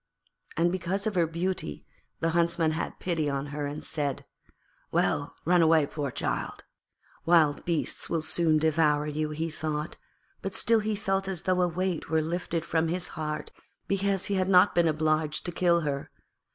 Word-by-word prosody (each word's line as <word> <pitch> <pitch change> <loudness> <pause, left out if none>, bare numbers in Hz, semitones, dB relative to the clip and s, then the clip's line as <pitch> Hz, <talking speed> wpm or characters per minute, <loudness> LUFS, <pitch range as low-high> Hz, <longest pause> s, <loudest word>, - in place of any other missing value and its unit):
And 170 +1 +3
because 185 +2 -2
of 215 - 0
her 175 -3 +2
beauty 170 - -3 0.4
the 165 - +1
Huntsman 170 -1 +2
had 160 - -4
pity 165 -5 -1
on 140 0 -2
her 145 -1 -2
and 145 +1 -6
said, 145 -3 -2 0.7
'Well, - - 0
run 175 +1 +4
away, 160 -2 +5
poor 145 -1 -4
child.' - - -3 0.6
Wild 165 -4 +4
beasts 170 -3 -1
will 165 -2 0
soon 160 -1 +3
devour 155 -1 +2
you, 150 0 -2
he 160 +2 -3
thought, 150 0 -4 0.4
but 195 - -4
still 230 -1 +4
he 215 0 -1
felt 195 -1 -1
as 185 -3 -4
though 185 -1 +2
a 180 - +3
weight 180 0 -2
were 160 0 +2
lifted 170 0 -2
from 165 -1 +1
his 175 +2 -2
heart 150 -2 -4 0.4
because 195 -1 0
he 205 - -2
had 190 -1 +1
not 185 +1 +6
been 170 -1 +3
obliged 155 0 0
to 175 - -2
kill 170 0 +2
her. 140 -2 -3
165 Hz, 175 wpm, -28 LUFS, 155-180 Hz, 0.7 s, not